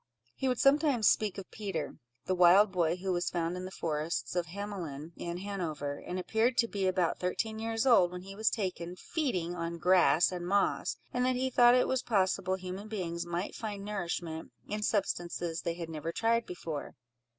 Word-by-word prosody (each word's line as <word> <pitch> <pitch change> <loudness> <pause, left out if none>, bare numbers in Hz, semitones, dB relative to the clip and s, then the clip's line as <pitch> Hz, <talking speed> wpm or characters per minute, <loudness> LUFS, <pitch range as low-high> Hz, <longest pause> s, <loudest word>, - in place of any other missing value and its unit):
He 265 - -2
would 250 -1 +1
sometimes 275 -5 +4
speak 210 -4 +2
of 195 - -8
Peter, 205 -3 -4 0.3
the 185 - +1
wild 185 +3 +6
boy, 170 -3 +1
who 185 +1 -2
was 175 0 0
found 170 0 -1
in 180 0 -5
the - - -5
forests 160 -1 -2
of 175 -1 0
Hamelin, 170 -6 -6
in 170 0 -4
Hanover, 165 -7 -4
and 180 - -5
appeared 220 +6 +1
to 230 - +4
be 195 -3 -1
about 185 -2 +1
thirteen 220 +4 -2
years 225 +1 -1
old 195 -9 +5
when 180 0 -7
he 195 +1 -9
was 220 +1 +2
taken 180 -4 -3
feeding 185 - -2
on 170 -1 -4
grass 175 -1 +4
and 175 -1 -4
moss, 200 +2 +1 0.2
and 250 - +1
that 255 - +2
he 260 +1 0
thought 240 0 +7
it 250 - +3
was 260 -1 +1
possible 190 -3 +1
human 190 +2 -6
beings 175 -5 -3
might 175 +3 -3
find 205 -3 -5
nourishment 175 -5 -4 0.2
in 210 +1 -3
substances 175 -5 -1
they 170 - -2
had 170 -1 -5
never 160 0 -4
tried 230 +5 +1
before. 165 -4 -6
185 Hz, 190 wpm, -31 LUFS, 170-215 Hz, 0.3 s, thought